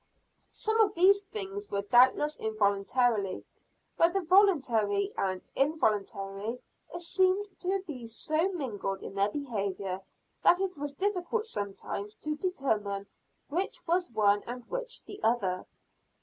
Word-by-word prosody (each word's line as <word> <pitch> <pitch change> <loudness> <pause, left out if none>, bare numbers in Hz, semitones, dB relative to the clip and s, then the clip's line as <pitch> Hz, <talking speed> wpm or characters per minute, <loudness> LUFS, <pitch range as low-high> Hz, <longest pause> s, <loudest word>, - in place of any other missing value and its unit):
Some 440 +1 -1
of 425 -3 +4
these 390 +4 +6
things 405 0 -6
were 200 0 -1
doubtless 260 +7 +4
involuntary 210 0 +1 0.5
but 335 +1 +5
the 390 - +1
voluntary 260 - +3
and 185 -1 -2
involuntary 215 -6 0 0.4
seemed 370 +3 +2
to 380 +1 -1
be 255 -8 -7
so 310 - 0
mingled 210 - -3
in - - -7
their 200 +1 +2
behavior, 200 -7 -3 0.4
that 355 - +6
it 385 -1 -1
was 290 -1 -5
difficult 400 +5 -1
sometimes 205 - -5
to 305 0 -3
determine 220 - -1 0.4
which 355 +7 -2
was 350 0 +1
one 205 -2 +3
and 245 0 -6
which - - -4
the 405 - -9
other. 195 -6 +1
260 Hz, 125 wpm, -30 LUFS, -, 0.5 s, these